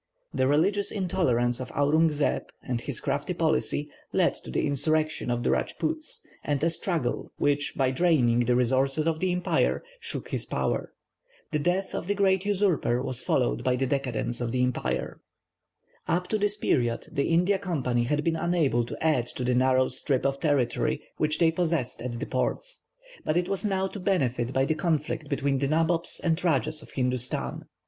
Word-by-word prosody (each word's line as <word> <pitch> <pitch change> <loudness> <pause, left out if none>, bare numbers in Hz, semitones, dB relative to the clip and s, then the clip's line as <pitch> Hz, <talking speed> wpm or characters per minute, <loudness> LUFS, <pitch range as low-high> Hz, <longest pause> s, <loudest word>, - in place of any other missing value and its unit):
The 130 - +2
religious 195 +8 +2
intolerance 130 - +1
of 130 - -6
Aurung 155 +3 +3
Zeb, 150 -1 0 0.2
and 125 -2 -2
his - - -3
crafty - - -2
policy, 65 - +1 0.2
led - - +3
to - - -12
the - - 0
insurrection 155 0 +1
of 120 0 0
the - - +2
Rajpoots, 315 -1 -2 0.2
and 145 -1 -1
a 165 - +3
struggle, 165 -5 -2
which 145 0 +1
by 130 -2 +2
draining 130 -6 +3
the 120 0 +2
resources 135 +4 +2
of 160 -1 0
the 185 +1 +1
empire, 180 0 +1 0.2
shook 460 - -5
his - - -3
power. - - -1 0.6
The 150 - +1
death 180 +5 0
of - - -4
the 205 - +1
great 190 -1 +2
usurper 185 -11 +2
was 130 -3 -3
followed - - +1
by 125 - +2
the 135 +1 0
decadence 125 -3 -2
of 120 -1 -1
the 125 0 +1
empire. 125 -1 -2 0.9
Up 180 +2 0
to 215 - 0
this 205 0 +1
period 120 - 0
the 140 - 0
India 180 +4 +3
Company 130 -11 0
had 150 +4 0
been 165 0 +1
unable 160 -8 +1
to - - -6
add 130 -7 +2
to 125 - -5
the 125 0 +1
narrow 130 +1 +3
strip 130 0 -1
of 135 0 0
territory 145 -6 +1
which 150 0 +1
they 165 -2 +4
possessed 160 -7 -1
at 120 -1 -4
the - - -3
ports, - - -2 0.4
but 155 - 0
it 175 0 +1
was 195 +1 -1
now 190 -2 0
to 205 - -7
benefit 130 -11 0
by 135 +1 +2
the 155 - +1
conflict 155 -2 -1
between 140 -1 0
the 140 - +1
nabobs 165 +3 +1
and 165 -2 +2
rajahs 155 -2 +1
of - - -13
Hindustan. 125 -1 -2
145 Hz, 185 wpm, -27 LUFS, 125-175 Hz, 0.9 s, they